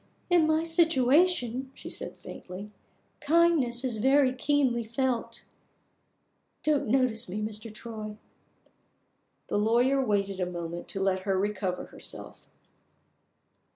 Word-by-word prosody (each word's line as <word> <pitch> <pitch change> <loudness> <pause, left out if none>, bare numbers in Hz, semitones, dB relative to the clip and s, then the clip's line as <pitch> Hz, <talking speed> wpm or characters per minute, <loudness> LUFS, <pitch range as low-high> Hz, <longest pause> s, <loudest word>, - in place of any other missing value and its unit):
"In 340 -3 +5
my 315 +1 +2
situation," 295 -5 +2
she - - -10
said - - -7
faintly, 190 +3 -9 0.5
"kindness 295 -6 +2
is 245 -4 -2
very 265 +3 +4
keenly 260 -3 +1
felt. 240 +2 -2 1.2
Don't 300 -4 +1
notice 240 -3 +1
me, 200 +4 -3
Mr. 215 +1 -4
Troy." 215 -1 -7 1.3
The - - -1
lawyer 245 +5 +3
waited 200 -4 0
a 180 - 0
moment 170 -1 -6
to 195 - -5
let 190 -1 +1
her 190 0 -1
recover 190 -2 -2
herself. - - -7
235 Hz, 115 wpm, -28 LUFS, 205-275 Hz, 1.3 s, In